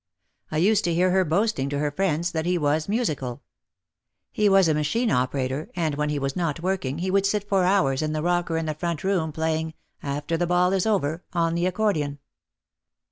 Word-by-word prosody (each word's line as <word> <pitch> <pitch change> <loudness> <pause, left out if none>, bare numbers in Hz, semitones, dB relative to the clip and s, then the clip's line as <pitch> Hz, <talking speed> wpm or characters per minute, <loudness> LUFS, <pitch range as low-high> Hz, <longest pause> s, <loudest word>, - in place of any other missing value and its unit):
I 155 - -1
used 205 +5 +3
to 170 - +1
hear 180 +2 +3
her 190 0 +3
boasting 175 -4 0
to 145 - -2
her 145 0 0
friends 170 0 0
that 160 0 -2
he 180 0 +2
was 155 +2 0
musical. 145 - -2 0.9
He 210 -1 +2
was 195 -2 +5
a 160 - +3
machine 215 +11 0
operator 130 +3 -1
and 165 -4 0
when 150 +1 -1
he 150 - -1
was 135 -1 -2
not 165 -4 -1
working 175 -6 -2
he 185 +2 -2
would 195 0 +3
sit 205 0 -1
for 195 -3 +2
hours 150 -8 +2
in 155 0 -1
the 155 0 -2
rocker 175 -1 0
in 165 - -2
the 155 - -2
front 170 0 -3
room 185 -5 0
playing 160 0 -2 0.3
"After 145 +3 -2
the 175 +1 0
Ball 180 +1 +3
is 190 +1 +1
Over" 175 -6 0
on 165 -1 +1
the 170 +1 +1
accordion. 180 -8 0
165 Hz, 205 wpm, -24 LUFS, 150-190 Hz, 0.9 s, was